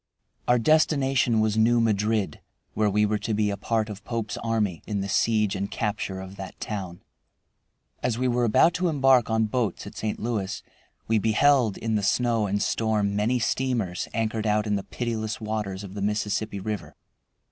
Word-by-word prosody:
Our 125 - +5
destination 135 -4 +3
was 110 0 +1
New 115 +2 +4
Madrid, 105 -5 0 0.3
where 105 -1 +2
we 105 +1 +3
were 105 0 0
to 110 - -2
be 105 -1 +1
a - - -2
part 110 +1 -1
of 100 -2 -8
Pope's 115 -2 -3
army 110 -7 -1
in 105 -2 -1
the 100 - -3
siege 105 0 +2
and 100 +1 -3
capture 105 -3 -3
of 95 +1 -10
that 95 -1 -8
town. 95 -5 -5 1.0
As 120 -2 0
we 130 +1 +1
were 120 0 +1
about 120 +9 +4
to 180 +1 0
embark 135 -6 +4
on 110 0 +2
boats 110 -3 -2
at - - -9
St. 110 -1 -3
Louis 105 -4 -3 0.4
we 115 -1 +3
beheld 115 +1 +3
in 115 -1 -2
the 105 - +1
snow 115 +1 +1
and 100 +1 0
storm 105 -3 0
many 110 +5 +1
steamers 115 -6 -1
anchored 110 -1 -1
out 105 0 +2
in 105 -1 0
the 100 - -2
pitiless 110 -3 -3
waters 105 -3 -3
of 95 -1 -9
the 100 - -5
Mississippi 105 0 -1
River. 105 -1 -5
110 Hz, 180 wpm, -26 LUFS, 105-115 Hz, 1.0 s, Our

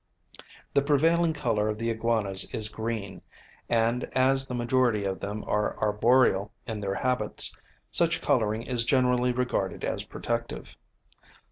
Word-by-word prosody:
The 140 - +4
prevailing 160 +4 +3
colour 115 -8 0
of 105 - -2
the 115 +1 -1
iguanas 110 -4 0
is 105 -1 -1
green; 110 -4 -5 0.5
and, 115 +2 +1
as 135 +1 +3
the 125 - -4
majority 120 -3 +1
of 95 -1 -2
them 105 +2 -5
are 105 0 -1
arboreal 105 -1 +3
in 110 -3 -4
their 100 -1 -2
habits, 125 -3 0 0.4
such 170 -1 +2
colouring 110 -5 +1
is 125 -2 0
generally 125 0 +2
regarded 125 -6 -2
as - - -2
protective. 115 0 -4
115 Hz, 135 wpm, -27 LUFS, 105-130 Hz, 0.5 s, The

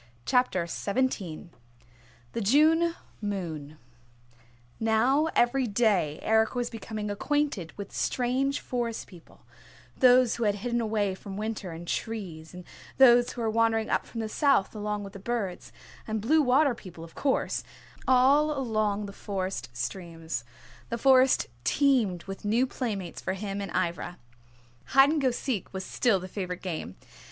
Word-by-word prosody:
CHAPTER 250 - +2
XVII 195 -4 -2 0.8
THE 230 - -2
JUNE 315 +9 +4 0.3
MOON 165 -8 -4 1.0
Now 240 +7 +3
every 245 +1 +3
day 200 -9 +2
Eric 220 +2 +2
was 245 -1 -2
becoming 215 -2 -5
acquainted 230 - -1
with 200 -1 -8
strange 265 +3 0
Forest 235 -2 -3
People: 175 -4 -17 0.5
those 250 -2 +5
who 235 - 0
had 205 -1 +2
hidden 235 +3 -1
away 210 -3 0
from 195 +1 -8
winter 215 -3 -4
in 165 +1 -8
trees, 175 -6 -4
and 180 0 -10 0.3
those 245 -2 +6
who 240 - -6
were 225 - +1
wandering 225 0 +1
up - - 0
from 230 - -5
the 220 - -2
south 275 -4 +2
along 210 -1 -3
with 195 0 -9
the 200 - -9
birds, 200 -4 -3 0.4
and 220 0 -1
Blue 305 +9 +3
Water 275 +1 +4
People, 180 -8 -11
of 165 - -12
course, 275 -2 0 0.4
all 280 +4 +4
along 215 -5 0
the 200 - -8
Forest 195 -2 -4
streams. 165 -7 -5 0.5
The - - -2
Forest 260 +1 +5 0.2
teemed 225 - +2
with 195 0 -8
new 225 +5 +2
playmates 205 -9 -4
for 190 - -2
him 200 +1 -4
and 200 - -4
Ivra. 175 -1 -2 0.7
Hide 270 - +6
and 310 -2 0
go 265 - +3
seek 240 -4 -3
was 190 -1 -5
still 225 -6 +2
the 185 - -7
favorite 180 -2 -5
game. 160 - -4
220 Hz, 150 wpm, -28 LUFS, 190-250 Hz, 1.0 s, those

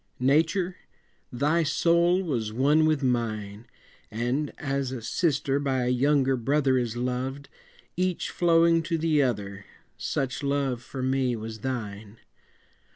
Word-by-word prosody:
Nature, 165 +7 +2 0.5
thy 150 +7 +1
soul 170 +4 +2
was 120 - -2
one 145 +7 +3
with 155 -3 +1
mine, 110 -4 -2 0.4
And, 120 +7 -2
as 135 -2 -2
a 130 - -4
sister 140 +2 0
by 135 -3 0
a 125 - 0
younger 135 +1 +2
brother 135 +2 +1
Is 120 -1 -3
loved, 130 +3 -3 0.5
each 185 0 -1
flowing 165 -1 +4
to 165 +1 -2
the 155 -2 +2
other, 100 -6 -2 0.3
Such 135 0 -2
love 140 -3 -1
for 130 +1 -6
me 130 -1 +1
was 110 0 -7
thine. 110 -4 -5
135 Hz, 130 wpm, -26 LUFS, 120-155 Hz, 0.5 s, flowing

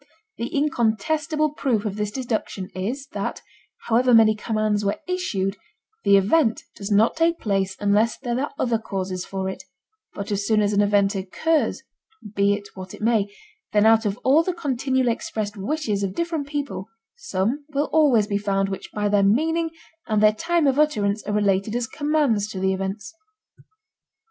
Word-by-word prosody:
The 235 - -3
incontestable 300 +4 0
proof 245 -7 -1
of 205 -2 -2
this 210 -1 -2
deduction 215 -5 -4
is 235 +9 -3
that, - - -4 0.4
however 240 +1 +4
many 220 -1 +6
commands 215 -1 -1
were 200 0 -1
issued, 205 - -1 0.5
the 200 - +6
event 225 +4 +2
does 200 0 -6
not 210 +2 +3
take 330 +1 +2
place 195 -2 -1
unless 205 +2 +2
there 245 -2 -2
are 285 - -2
other 235 -3 +1
causes 190 -4 -4
for 190 -1 -4
it, 190 - -5 0.5
but 200 +1 -5
as 205 0 0
soon 220 -1 +3
as 205 0 +1
an 205 - +3
event 200 0 +3
occurs—be 215 - 0 0.7
it 205 0 -5
what 185 -1 -9
it - - -15
may—then 225 - -1
out 225 0 +5
of 200 +1 -2
all 280 +5 +5
the 355 +1 -2
continually 260 -5 0
expressed 215 -1 -4
wishes 210 0 -2
of 195 -1 -2
different 330 -4 -2
people 285 -9 -4 0.3
some 245 - -2
will 290 0 0
always 280 -9 +4
be 205 -1 -1
found 195 -1 0
which 195 - -6
by 210 -1 0
their 205 0 +3
meaning 320 +11 +2 0.4
and 215 -2 +1
their 215 0 +6
time 335 +7 0
of 275 +1 +2
utterance 210 -9 +1
are 210 - -1
related 205 +1 +1
as 245 -1 0
commands 290 -7 0
to 205 -3 -6
the 190 0 +1
events. 195 +5 -4
215 Hz, 170 wpm, -23 LUFS, 200-285 Hz, 0.7 s, many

